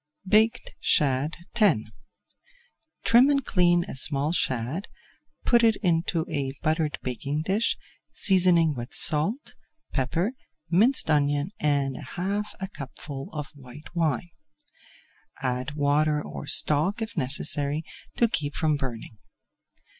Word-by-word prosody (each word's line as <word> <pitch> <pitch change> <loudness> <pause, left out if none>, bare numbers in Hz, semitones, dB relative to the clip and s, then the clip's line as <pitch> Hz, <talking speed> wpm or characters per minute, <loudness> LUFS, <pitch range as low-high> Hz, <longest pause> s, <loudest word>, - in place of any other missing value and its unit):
BAKED 220 +4 +2
SHAD 140 +2 +1 0.2
X 205 - +4 1.2
Trim 245 +4 +5
and 275 -3 +1
clean 175 -2 +3
a - - -8
small 140 +3 +3
shad, 130 - -1 0.6
put 240 -1 +4
it 225 -2 +4
into 165 -2 +1
a 135 -2 -3
buttered 155 -1 0
baking 140 +4 -3
dish, 200 +6 0 0.3
seasoning 175 -5 +3
with 120 -1 -5
salt, 180 - +2 0.4
pepper, 165 - 0 0.4
minced 215 - +3
onion 145 +2 +1
and 140 -3 0 0.2
half 200 +4 -3
a 190 - -4
cupful 140 -3 -8
of 150 -3 -6
white 140 +2 -13
wine. 165 0 -1 1.1
Add 130 +3 -2
water 150 +1 +2
or - - -8
stock, 155 +9 +4
if 220 - -7
necessary, 145 +3 +1 0.3
to 235 - +4
keep 150 -9 -3
from 155 -2 +1
burning. 120 -5 -7
155 Hz, 115 wpm, -26 LUFS, 140-190 Hz, 1.2 s, Trim